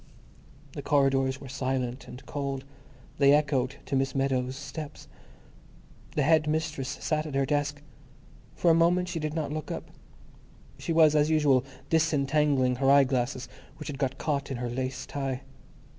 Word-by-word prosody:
The 145 - -6
corridors 135 -2 +2
were 140 - -9
silent 130 -1 -3
and 125 - -10
cold; 140 -2 -4 0.5
they 140 0 +6
echoed 140 -3 +1
to - - -2
Miss 135 0 0
Meadows' 130 -1 0
steps. 145 +2 -8 1.1
The 150 - +2
head 155 +1 +4
mistress 155 -3 -1
sat 155 -1 -1
at 145 - -6
her 135 0 +2
desk. 145 +1 -1 0.7
For 170 - +3
a - - +6
moment 175 +2 +3
she 170 - -3
did 155 0 -3
not 155 -3 -2
look 155 -1 -5
up. - - -6 0.9
She - - -3
was 160 -2 +5
as 150 0 +3
usual 145 -5 +4 0.3
disentangling 145 -4 +2
her 135 +1 +2
eyeglasses, 130 -2 +3 0.3
which 150 - -7
had 140 -2 -6
got 135 -1 -1
caught 140 -2 -2
in 135 - -3
her 120 0 -3
lace 130 +1 -3
tie. 135 -2 -3
140 Hz, 160 wpm, -28 LUFS, 130-150 Hz, 1.1 s, they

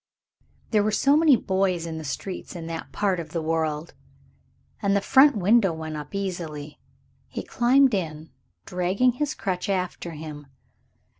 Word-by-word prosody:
There 210 -2 +3
are - - +1
so 275 +6 +3
many 310 -3 +6
boys 190 -5 0
in 160 -1 -5
the - - -7
streets 180 +7 -5
in 165 -2 -6
that 165 0 -6
part 195 -3 0
of 160 -2 -7
the 165 - -1
world. 160 -1 -1 0.9
And 200 -1 +2
the - - +4
front 265 +5 +5
window 200 -1 +4
went 160 -1 -6
up 150 +4 -7
easily. 165 -7 -5 0.5
He - - -6
climbed 260 +1 +3
in, 160 -4 -3 0.3
dragging 185 +7 +1
his 285 +4 -2
crutch 185 +1 -3
after 180 -3 -2
him. 150 -2 -8
180 Hz, 155 wpm, -25 LUFS, 160-205 Hz, 0.9 s, many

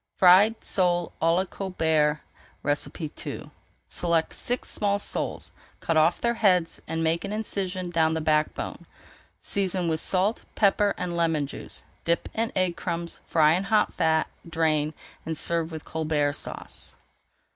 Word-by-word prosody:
FRIED 195 +5 +6
SOLE 175 -2 +1
À 165 +1 +4
LA 185 +2 +1
COLBERT 160 -6 0 0.4
II 145 +2 -3 0.4
Select 170 -2 0
six 245 +1 -1
small 200 -1 +1
soles, 205 - -3 0.3
cut 165 - -1
off 160 +2 +4
their 235 0 +1
heads, 185 -7 +2
and 165 0 -2
make 165 +1 +1
an 200 - -4
incision 190 -4 -3
down 160 -1 +2
the - - 0
back 155 -1 +1
bone. - - -6 0.5
Season 185 -3 0
with 160 -1 0
salt, 195 +6 +1
pepper, 205 0 +3
and 180 -1 -3
lemon 165 -3 +1
juice, 140 - -9 0.2
dip 170 0 0
in 225 +1 0
egg 185 - +4
and 175 -2 -4
crumbs, 170 -1 -4
fry 155 -1 +4
in 185 +3 0
hot 210 +1 +2
fat, 160 -1 +2 0.2
drain, 155 -2 +1 0.3
and 160 -1 -1
serve 170 0 +1
with 160 -1 -7
Colbert 150 -2 0
Sauce. - - -5
170 Hz, 150 wpm, -26 LUFS, 160-190 Hz, 0.5 s, FRIED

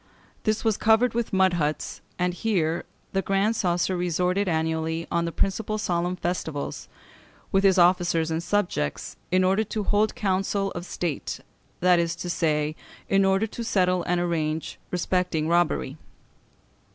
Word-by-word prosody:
This 215 +1 0
was 220 -3 +2
covered 225 +2 +3
with 235 -1 -1
mud 190 -1 +3
huts; 155 -3 -2 0.2
and 180 0 0
here 175 -5 0 0.3
the 195 - +2
Grand 195 +3 +1
Coesre 180 -2 0
resorted 180 +3 0
annually 160 0 -1
on 170 0 +1
the 170 - -2
principal 215 +4 -1
solemn 175 -3 -1
festivals, 170 -5 -3 0.6
with 195 0 +3
his 195 -1 +5
officers 175 -2 +3
and 160 +1 -1
subjects, 175 - -1
in 185 +1 +3
order 190 +4 +3
"to 215 0 -3
hold 210 +2 +2
his - - -16
council 195 0 0
of 175 +1 -6
state," 165 -5 -3 0.4
that 180 -1 +5
is 170 0 0
to 175 - -4
say, 155 -2 0 0.3
in 195 0 +4
order 195 +2 +3
to 230 +2 -6
settle 185 -5 +2
and 175 0 +1
arrange 160 -2 -2
respecting 180 -3 0
robbery. 170 -4 +1
180 Hz, 150 wpm, -25 LUFS, 170-195 Hz, 0.6 s, his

